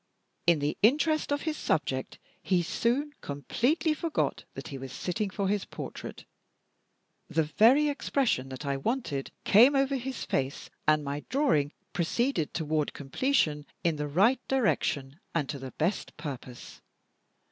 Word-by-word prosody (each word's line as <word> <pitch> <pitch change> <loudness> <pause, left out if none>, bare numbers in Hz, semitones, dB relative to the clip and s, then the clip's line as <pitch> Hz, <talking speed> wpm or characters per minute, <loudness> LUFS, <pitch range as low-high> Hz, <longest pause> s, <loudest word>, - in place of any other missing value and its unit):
In 170 -2 +6
the 145 +1 -2
interest 305 +7 +3
of 285 0 0
his 310 -1 -2
subject - - -1 0.2
he 180 -2 +2
soon 260 - 0
completely 245 - 0
forgot 320 0 -1
that - - -7
he 140 - -6
was 130 -1 -7
sitting 185 - -2
for 195 0 -2
his 205 0 +1
portrait - - -8 1.0
the 160 - +2
very 240 - +5
expression 270 - 0
that 130 +3 -7
I 140 -1 0
wanted 155 - -2
came 245 +8 +7
over 275 0 +2
his 260 0 -5
face 135 +1 -2 0.2
and 155 -1 +4
my 145 +1 -4
drawing 255 - +2 0.2
proceeded 175 - 0
toward 155 -2 -1
completion, 150 - 0 0.2
in 165 -3 +1
the 150 0 -2
right 205 - +4
direction, 155 - 0 0.2
and 150 -4 +1
to 145 - -4
the 130 -1 -8
best 175 +6 -2
purpose. 130 -5 -8
175 Hz, 145 wpm, -29 LUFS, -, 1.0 s, came